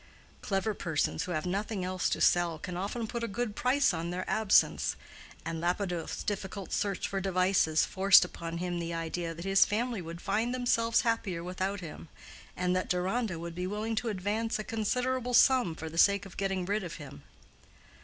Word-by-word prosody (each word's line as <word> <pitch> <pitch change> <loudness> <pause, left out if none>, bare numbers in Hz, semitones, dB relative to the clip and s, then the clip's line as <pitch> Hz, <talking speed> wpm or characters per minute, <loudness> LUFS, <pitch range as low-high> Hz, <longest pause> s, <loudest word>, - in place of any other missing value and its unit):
Clever 200 +2 -1
persons 160 -6 -1
who 180 - -5
have 155 -1 -2
nothing 195 +1 -2
else 185 0 -1
to - - -2
sell 175 -2 +3
can 180 +3 -6
often 205 +6 -3
put 235 +1 -4
a - - 0
good 215 +1 -3
price 255 -3 +2
on 165 0 -3
their 180 +1 -4
absence, 215 0 +3 0.5
and 165 0 -3
Lapidoth's 175 -1 -2
difficult 200 -1 -4
search 200 -3 -1
for 195 0 -2
devices 185 -4 +2
forced 195 -1 +6
upon 170 -1 -6
him 175 0 -2
the 170 0 -3
idea 165 0 -3
that 170 +3 -8
his 195 0 +6
family 230 0 -1
would 165 0 -7
find 225 +7 0
themselves 230 -2 +2
happier 205 -7 -1
without 185 +2 -3
him, 165 -1 -9 0.5
and 180 0 +1
that 185 - -1
Deronda 185 +2 0
would 170 +1 -6
be 180 +2 -3
willing 210 +3 -2
to 240 0 0
advance 210 +3 -1
a 215 - -4
considerable 250 +3 -1
sum 245 -9 +5
for 160 - -6
the 165 +1 -4
sake 200 +1 +5
of 195 - -12
getting 195 -2 -1
rid 205 +2 -1
of 175 - -6
him. 140 - -10
190 Hz, 185 wpm, -30 LUFS, 175-215 Hz, 0.5 s, forced